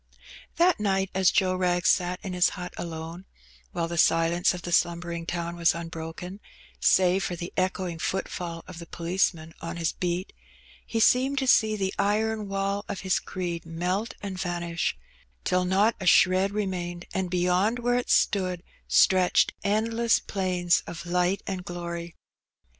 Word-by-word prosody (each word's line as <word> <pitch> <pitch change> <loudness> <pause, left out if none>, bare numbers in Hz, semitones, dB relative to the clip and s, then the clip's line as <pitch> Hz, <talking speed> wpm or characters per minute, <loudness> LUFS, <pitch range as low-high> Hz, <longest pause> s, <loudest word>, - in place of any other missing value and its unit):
That 350 -3 +3
night, 195 -2 0
as 190 -1 +4
Joe 185 -1 +2
Wrag 180 -1 0
sat 180 0 +2
in 190 - -4
his 180 0 +3
hut 180 0 -6
alone, 165 +2 -6 0.5
while 170 -1 -2
the 170 0 -5
ilence 165 +1 +3
of 180 -2 -6
the 175 - -5
slumbering 170 0 0
town 170 0 -3
was 170 -1 +3
unbroken, 165 +3 -7 0.4
save 185 +1 +4
for 180 - -2
the 175 +1 -7
choing 185 -2 -1
footfall 175 -3 -3
of 180 -2 -9
the 170 - -9
policeman 170 -2 -1
on 165 +1 -5
his 165 -1 0
beat, 180 +1 -3 0.5
he 230 - -1
seemed 260 +5 +3
to 265 -1 0 0.2
ee 215 - -1
the 195 -2 -2
iron 215 +1 0
wall 195 +1 -1
of 200 - -5
his 190 -2 +1
creed 175 -3 -4
melt 180 +6 -2
and 190 -2 -5
vanish, 175 -1 -2 0.5
till 180 0 +1
not 200 +5 +3
a - - -3
hred 185 +2 +5
remained, 180 -4 -3
and 190 -1 -1
beyond 180 +5 +1
where 245 0 +1
it 245 - -6
stood 185 -3 +2 0.2
stretched 185 -1 +4
end 220 +3 0
ess 235 -1 +4
plains 180 -3 0
of 170 0 -7
light 180 +2 0
and 190 -2 -4
glory. 170 -1 -6
180 Hz, 160 wpm, -26 LUFS, 170-195 Hz, 0.5 s, hred